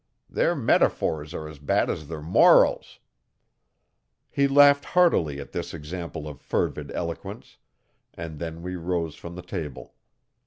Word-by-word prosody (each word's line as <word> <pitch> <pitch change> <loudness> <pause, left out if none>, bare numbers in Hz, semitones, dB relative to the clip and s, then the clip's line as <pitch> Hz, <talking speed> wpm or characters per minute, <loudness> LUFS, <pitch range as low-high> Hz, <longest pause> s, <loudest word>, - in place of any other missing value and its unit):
Their - - +1
metaphors 75 -1 +1
are 80 -2 -6
as 75 -2 -11
bad 70 - +1
as 75 - -4
their 80 -1 -7
morals. 85 +4 +4 1.3
He 140 0 +2
laughed 140 0 +6
heartily 85 - +2
at 70 - -9
this - - -5
example 80 0 -6
of 75 -3 -9
fervid - - -2
eloquence, 85 -1 -6 0.6
and 80 -2 -7
then 85 0 -6
we 90 +1 -4
rose 85 -2 -2
from 85 0 -10
the 90 - -8
table. 75 -4 -7
80 Hz, 140 wpm, -25 LUFS, 75-90 Hz, 1.3 s, laughed